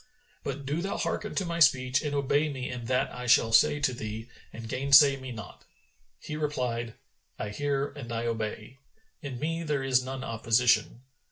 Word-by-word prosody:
But 140 0 -5
do 150 +5 -1
thou 195 +2 -3
hearken 210 - -3
to 190 - 0
my 170 0 -3
speech 135 -3 +4
and 150 -2 -3
obey 145 +2 +1
me 130 -2 -5
in 125 -2 -6
that 130 +2 0
I 125 0 -6
shall 115 -2 +5
say 145 +6 +5
to 135 -2 +1
thee 110 0 -6 0.2
and 115 0 -8
gainsay 135 +3 +6
me 130 -1 -8
not." 110 -6 -10 0.5
He 150 - -7
replied, 125 -6 -2 0.4
"I 105 - -4
hear 140 +5 -1
and 125 -5 -9
I 115 0 -2
obey: 115 +2 -4 0.4
in 135 -4 -6
me 165 +3 -2
there 150 -4 -1
is 130 -1 +2
none 130 +1 -5
opposition." 115 +1 +1
130 Hz, 180 wpm, -28 LUFS, 115-145 Hz, 0.5 s, gainsay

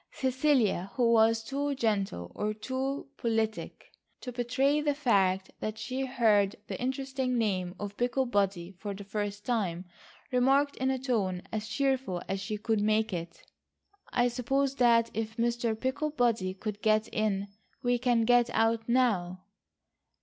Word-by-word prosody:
Cecilia, 260 -8 +1
who 240 -3 +3
was 225 0 +4
too 280 +3 -2
gentle 195 - -1
or 210 0 -2
too 265 +5 -3
politic 225 -2 -2 0.3
to 250 - -5
betray 260 +5 +1
the 295 -1 +1
fact 195 -9 +2
that 215 0 -4
she 255 +5 -3
heard 215 -6 +3
the - - -6
interesting 265 0 -1
name 185 -5 -1
of 205 0 -6
Picklebody 205 -8 0
for 205 -1 -4
the 200 - -8
first 205 0 -4
time, 190 -7 -1 0.5
remarked 270 +3 +3
in 260 +1 0
a 265 - +1
tone 210 -9 -1
as 215 0 -3
cheerful 260 -5 0
as 195 0 -2
she 205 +2 -3
could 215 0 0
make 215 0 +1
it: 170 0 -6 0.7
"I 245 0 +3
suppose 270 +3 0
that 230 -2 +4
if 225 +1 -4
Mr. 235 -1 0
Picklebody 245 -8 0
could 210 +1 -5
get 215 0 +3
in 200 -2 -1 0.3
we 245 0 +2
can 240 -2 +2
get 245 0 +4
out 225 0 +1
now." 190 -8 +1
230 Hz, 145 wpm, -29 LUFS, 205-255 Hz, 0.7 s, was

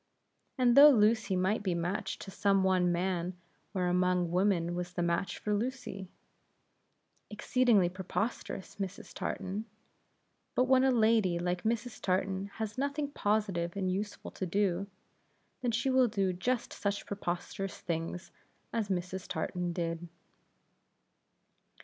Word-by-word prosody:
And 245 -2 +4
though 290 +2 +11
Lucy 220 -5 +3
might 190 +4 +1
be 185 -4 0
matched 175 +4 -2
to 195 - -8
some 195 0 +2
one 185 -2 +3
man, 180 0 -1 0.3
where 185 -3 0
among 180 -1 +2
women 180 -2 +2
was 180 0 -4
the 175 - -1
match 170 +2 0
for 210 - -2
Lucy? 210 -4 -3 1.2
Exceedingly 220 -2 +3
preposterous 190 +2 -4
Mrs. 195 -1 -5
Tartan! 195 +3 -3 0.9
But 250 - +4
when 260 0 +4
a 265 - +5
lady 220 -7 +3
like 180 +1 -1
Mrs. 235 +1 -2
Tartan 190 +1 0
has 220 +2 -4
nothing 285 +1 -1
positive 205 - 0
and 185 -2 0
useful 205 +2 -4
to 185 - -4
do, 195 0 +1 0.7
then 245 - 0
she 235 +4 +1
will 260 -1 +5
do 195 -4 0
just 240 +7 -1
such 200 0 -2
preposterous 195 0 -4
things 170 +1 -4 0.4
as 220 -3 -1
Mrs. 185 0 -3
Tartan 180 -1 -2
did. 170 0 -3
195 Hz, 130 wpm, -31 LUFS, 180-220 Hz, 1.2 s, though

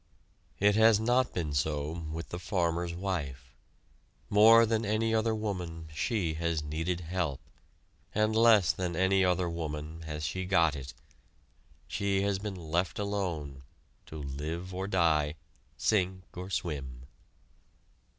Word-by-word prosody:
It 105 +1 +4
has 110 -1 +6
not 120 +3 +2
been 80 -5 -3
so 75 +1 -1 0.2
with 80 +1 -5
the 85 - -5
farmer's 85 -2 -1
wife. 70 -9 -4 0.8
More 115 +3 +8
than 110 0 0
any 110 +2 0
other 110 0 +2
woman 90 -7 -4
she 90 0 -1
has 80 -1 -1
needed 80 +4 -2
help, 85 -5 -2 0.8
and 110 +1 +2
less 110 -8 +6
than 90 +1 -3
any 95 +2 +3
other 90 -1 +2
woman 80 -1 -5
has 75 0 -5
she 95 +6 -2
got 85 -4 +3
it. 70 -2 -8 0.9
She 100 -1 0
has 100 -1 0
been 100 -1 -5
left 85 +1 -2
alone, 90 -10 -3 0.5
to 80 - -8
live 75 +6 -5
or 95 +1 -3
die, 80 -6 +2 0.4
sink 95 -3 +1
or 90 +1 -6
swim. 70 -9 -4
90 Hz, 130 wpm, -30 LUFS, 80-100 Hz, 0.9 s, More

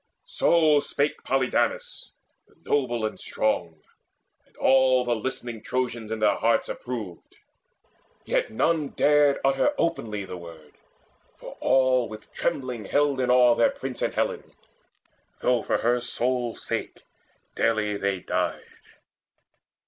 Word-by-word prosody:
So 165 - +3
spake 145 0 -2
Polydamas 130 -1 -1 0.4
the - - -27
noble 120 -5 0
and 110 - -4
strong, 85 -7 -2 0.6
And - - -29
all 130 -1 +4
the 120 -1 +1
listening 120 -1 -5
Trojans 120 -3 -3
in 110 - -1
their 105 -2 +2
hearts 115 +3 +1
Approved; 110 -8 -7 0.9
yet - - 0
none 155 +6 +1
dared 145 -1 +4
utter 135 - +2
openly 110 -12 -2
The 90 - -7
word, 80 -3 -12 0.6
for - - -10
all 130 -2 +3
with 110 0 -11
trembling 125 -5 -2
held 145 +3 +1
in 125 -1 0
awe 125 -1 +6
Their 115 - +3
prince 130 -2 -6
and - - -1
Helen, - - -2 0.9
though 125 -2 +2
for - - 0
her 120 +1 +1
sole 125 -1 -1
sake - - -5 0.5
Daily 110 -2 0
they 100 -2 -1
died. - - -2
125 Hz, 125 wpm, -25 LUFS, 110-135 Hz, 0.9 s, awe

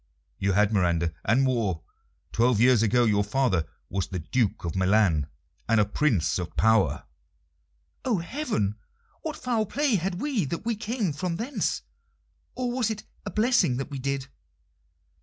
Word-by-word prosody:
"You 100 0 +1
had, 105 +2 +3
Miranda, 85 -4 +1
and 120 +6 +3
more. 115 -11 0 0.5
Twelve 120 -1 +3
years 120 -1 +5
ago 120 +2 +3
your 105 -2 +3
father 105 - +1 0.2
was 95 0 -2
the 95 - -4
Duke 100 +4 -1
of 85 - -3
Milan, 95 -6 +3 0.4
and 115 -1 +4
a 105 - +4
Prince 105 - +1
of 90 - -6
power." 110 -2 +3 1.0
"Oh, 240 -5 +1
heaven! 170 - -2 0.4
what 315 -1 -4
foul 235 -4 0
play 280 -2 +1
had 185 +1 -2
we 270 -8 0
that 170 +9 -4
we 235 -1 0
came 215 - -2
from 175 +3 -2
thence? 240 +10 -2 0.7
Or 250 -1 -1
was 245 -3 0
it 215 -1 -4 0.2
a - - -1
blessing 220 - +2
that 135 +2 -5
we 140 - -4
did?" 135 0 -2
125 Hz, 160 wpm, -26 LUFS, -, 1.0 s, years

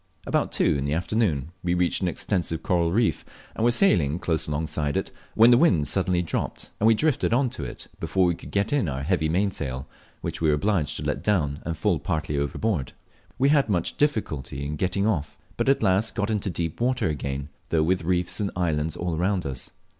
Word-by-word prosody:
About - - 0
two - - +2
in 70 - -2
the 70 +2 0
afternoon 85 - 0
we 90 0 0
reached 90 +1 +1
an 90 - +1
extensive 85 -2 -2
coral 85 -2 +1
reef, 110 +4 +1 0.3
and - - -2
were 120 - +5
sailing 85 - +3
close 80 -2 -1
alongside 75 -1 -1
of - - 0
it, - - -16 0.2
when 115 +2 +7
the 120 - +6
wind 85 - +4
suddenly 90 -2 +1
dropped, 85 - -4
and 110 - +4
we 115 - +6
drifted 140 -3 +1
on 130 -1 +2
to - - -5
it - - -6
before 95 -1 +1
we 85 - +3
could - - -10
get 100 +5 0
in 120 - +1
our 65 0 -3
heavy 80 -1 +1
mainsail, 75 -7 -1 0.3
which - - -4
we 80 - +3
were 75 - +4
obliged 85 -2 0
to - - -5
let - - -1
run - - -10 0.2
down 75 -3 -2
and 85 -1 -2
fall - - +1
partly 75 -2 -2
overboard. 70 - -1 0.4
We 135 +2 +3
had 140 -5 +3
much 90 -5 0
difficulty 75 - -1
in 75 +1 -3
getting 95 +5 0
off, 80 -10 -1 0.2
but - - 0
at 135 - +3
last 95 +4 +2
got 105 0 0
into 105 -2 -1
deep 85 +2 -3
water 125 -3 +1
again, 70 -1 -3 0.2
though 80 -1 +2
with 90 +2 +1
reefs 90 +2 0
and 100 -2 0
islands 80 -3 0
all 85 -1 -2
around 90 +2 0
us. 65 -2 -4
85 Hz, 215 wpm, -25 LUFS, 75-105 Hz, 0.4 s, when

